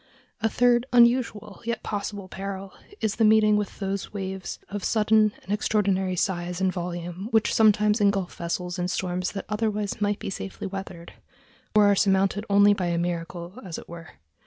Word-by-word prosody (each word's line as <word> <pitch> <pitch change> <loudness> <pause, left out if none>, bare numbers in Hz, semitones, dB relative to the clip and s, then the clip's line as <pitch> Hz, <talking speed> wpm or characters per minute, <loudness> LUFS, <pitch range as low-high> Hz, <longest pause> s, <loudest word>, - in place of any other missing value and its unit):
A 225 - +2
third 245 +1 +3
unusual, 235 -4 +3
yet 235 -1 -3
possible, 200 -1 -4
peril 195 0 -6 0.3
is 220 -1 -1
the 225 - +3
meeting 215 -1 +5
with 210 -1 -2
those 195 -1 -3
waves 190 -2 -5
of 200 -1 -5
sudden 215 -1 +3
and 190 - -8
extraordinary 195 -3 +1
size 175 -1 -1
and 190 -1 +1
volume 175 +1 -5
which 220 -2 +2
sometimes 210 0 +4
engulf 200 -3 +1
vessels 180 +1 -3
in 180 - 0
storms 180 0 -2
that 195 - -5
otherwise 210 -1 -2
might 205 0 +1
be - - -5
safely 195 0 -6
weathered, 190 -3 -7 0.6
or 210 -1 +7
are 205 0 +5
surmounted 195 +1 +2
only 200 0 +6
by 185 -3 -2
a 170 -1 0
miracle, 170 +3 -4
as 175 -4 -6
it - - -10
were. 170 -1 -10
200 Hz, 170 wpm, -25 LUFS, 185-210 Hz, 0.6 s, or